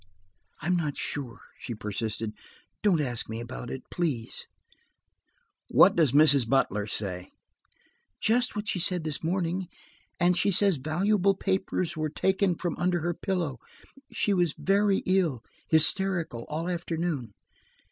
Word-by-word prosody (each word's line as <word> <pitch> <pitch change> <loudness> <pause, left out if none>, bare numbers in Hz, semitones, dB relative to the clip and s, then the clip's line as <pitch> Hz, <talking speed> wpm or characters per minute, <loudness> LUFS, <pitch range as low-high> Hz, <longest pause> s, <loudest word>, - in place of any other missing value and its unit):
"I'm 175 +2 +2
not 155 -5 -2
sure," 130 -5 -4 0.2
she 120 - -5
persisted. 105 +1 -4 0.5
"Don't 195 -6 +3
ask 120 -6 -2
me 110 +1 -4
about 120 +1 -7
it, 130 - -6
please." 145 -10 -2 1.2
"What - - +6
does 155 -7 +3
Mrs. 140 -4 +5
Butler 105 -6 +1
say?" 90 -3 -4 0.9
"Just 240 +2 +2
what 210 0 -4
she 185 - 0
said 180 -1 +1
this 155 -1 -3
morning. 180 +1 -1 0.5
And 175 0 +4
she 190 - +2
says 195 -2 +3
valuable 190 +7 +1
papers 190 -3 -1
were 155 0 -2
taken 190 +3 +1
from 175 -1 -3
under 175 -1 +1
her 175 +2 -1
pillow. 170 -8 -2 0.5
She 205 - 0
was 175 -5 +1
very 200 0 +2
ill–hysterical, 165 - +1
all 160 +3 -3
afternoon." 165 - -3
165 Hz, 130 wpm, -28 LUFS, 130-185 Hz, 1.2 s, What